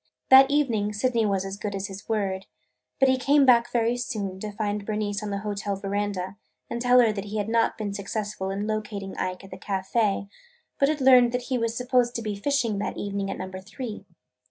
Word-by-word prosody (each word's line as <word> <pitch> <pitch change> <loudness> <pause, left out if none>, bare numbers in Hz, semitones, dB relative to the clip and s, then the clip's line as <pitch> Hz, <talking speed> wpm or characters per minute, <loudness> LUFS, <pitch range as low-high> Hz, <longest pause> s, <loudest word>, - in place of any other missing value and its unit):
That 265 +1 +9
evening 235 -8 +1
Sydney 230 +1 +1
was 195 -1 0
as 195 +1 -5
good 205 -1 -4
as 195 0 -3
his 195 0 -9
word. 195 -3 -1 0.5
But 270 - +5
he 260 0 +3
came 280 +2 +4
back 240 -2 +5
very 235 0 +1
soon 200 -6 -4
to 210 +1 -5
find 205 0 -2
Bernice 210 0 -2
on 210 - -4
the 200 0 -3
hotel 205 -1 -2
veranda 195 -1 -3 0.3
and 235 - -3
tell 250 0 +6
her 230 -2 +4
that 205 -1 -5
he 210 +1 -5
had 205 -1 -1
not 230 0 +1
been 205 -2 -3
successful 205 -1 -4
in 200 +2 -2
locating 210 -2 -4
Ike 185 0 -3
at 195 - -13
the 185 - -8
café 200 +1 0 0.5
but 275 - +4
had 305 -2 -1
learned 250 -2 +6
that 250 0 -3
he - - +2
was 230 0 -1
supposed 250 -1 +1
to 230 - -3
be 210 -2 -3
fishing 230 -2 0
that 205 - -3
evening 200 -1 -3
at - - -4
Number 185 0 -6
Three. 210 0 -7
210 Hz, 215 wpm, -26 LUFS, 200-240 Hz, 0.5 s, That